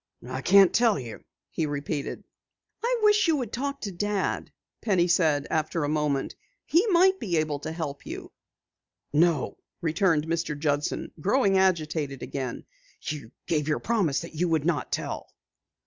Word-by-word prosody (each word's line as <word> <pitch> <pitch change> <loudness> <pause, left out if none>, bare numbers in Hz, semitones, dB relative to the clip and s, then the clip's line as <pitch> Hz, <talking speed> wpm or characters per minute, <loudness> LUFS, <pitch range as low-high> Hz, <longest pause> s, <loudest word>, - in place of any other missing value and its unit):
"I 130 +1 -4
can't 195 +4 +6
tell 230 -4 +4
you," 120 -5 -8 0.3
he 160 - -1
repeated. 145 0 -3 0.6
"I 485 0 +1
wish 420 -2 +5
you 325 - +4
would 245 -7 -3
talk 280 +2 -3
to 200 - -4
Dad," 205 +2 -2 0.3
Penny 185 -5 +2
said 155 -5 +2
after 155 0 0
a 145 - 0
moment. 150 -3 0 0.3
"He 350 +8 +3
might 380 0 +4
be 175 -5 -1
able 155 -2 0
to 155 +2 -5
help 155 -4 -5
you." - - -7 0.8
"No," 165 0 +2 0.2
returned 165 -2 +2
Mr. 165 -2 -2
Judson, 145 0 -1
growing 200 - +2
agitated 155 -7 0
again, 130 -3 -4 0.4
"you 145 -7 -5 0.2
gave 150 -3 0
your 150 - +1
promise 200 -11 0
that 170 - -9
you 170 +3 0
would 160 -2 +1
not 170 -3 0
tell." - - -3
165 Hz, 155 wpm, -27 LUFS, 150-200 Hz, 0.8 s, can't